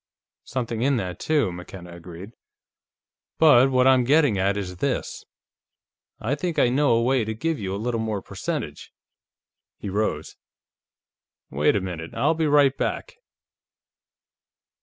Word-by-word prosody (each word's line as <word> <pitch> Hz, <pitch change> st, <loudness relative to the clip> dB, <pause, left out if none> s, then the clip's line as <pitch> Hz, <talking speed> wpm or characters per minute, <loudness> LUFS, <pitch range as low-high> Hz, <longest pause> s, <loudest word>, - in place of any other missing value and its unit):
"Something 115 Hz, -3 st, -3 dB
in 135 Hz, +1 st, +2 dB
that, 90 Hz, -5 st, -4 dB
too," 150 Hz, -11 st, +1 dB
McKenna 90 Hz, 0 st, -10 dB
agreed. 85 Hz, +4 st, -10 dB, 1.1 s
"But 135 Hz, -5 st, +6 dB
what 130 Hz, -1 st, +3 dB
I'm 130 Hz, -1 st, +5 dB
getting 145 Hz, -2 st, +3 dB
at 100 Hz, +2 st, +1 dB
is 90 Hz, -3 st, -5 dB
this: -, -, -3 dB, 0.9 s
I 120 Hz, +6 st, -2 dB
think 165 Hz, +3 st, -3 dB
I 120 Hz, -, +4 dB
know 140 Hz, +1 st, +2 dB
a 115 Hz, 0 st, +2 dB
way 130 Hz, 0 st, +2 dB
to 110 Hz, 0 st, -4 dB
give 160 Hz, +6 st, -2 dB
you 95 Hz, -1 st, -3 dB
a -, -, -3 dB
little 115 Hz, +2 st, -2 dB
more 110 Hz, -2 st, -2 dB
percentage." -, -, -5 dB, 0.9 s
He 100 Hz, -, -6 dB
rose. 105 Hz, +3 st, -2 dB, 1.1 s
"Wait 75 Hz, +2 st, +2 dB
a 100 Hz, -, +1 dB
minute; 85 Hz, -3 st, -6 dB
I'll 135 Hz, +8 st, +2 dB
be 160 Hz, -1 st, 0 dB
right 145 Hz, -2 st, +4 dB
back." -, -, -3 dB
115 Hz, 140 wpm, -24 LUFS, 95-135 Hz, 1.1 s, But